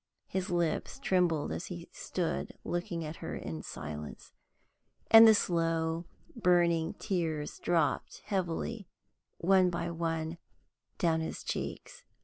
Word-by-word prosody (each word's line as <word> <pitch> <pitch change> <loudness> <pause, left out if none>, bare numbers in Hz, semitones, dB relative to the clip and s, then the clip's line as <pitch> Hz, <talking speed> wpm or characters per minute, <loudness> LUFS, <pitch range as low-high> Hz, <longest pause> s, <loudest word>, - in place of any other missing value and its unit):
His 190 +1 -3
lips 175 -3 0
trembled 180 - +1
as 170 - -4
he 170 -2 -7
stood 175 -3 -3
looking 175 -1 -3
at 155 +2 -6
her - - -5
in 80 -1 -5
silence, 75 -1 -7 0.8
and 225 0 +11
the 220 - +8
slow, 165 -2 0 0.3
burning 175 -6 +3
tears 160 -5 -2
dropped 170 -2 0
heavily, 190 +2 -2 0.5
one 185 +1 +4
by 170 -1 -2
one, 165 0 -2 0.6
down 160 -2 +2
his 160 - -4
cheeks. - - -5
170 Hz, 120 wpm, -31 LUFS, 160-180 Hz, 0.8 s, and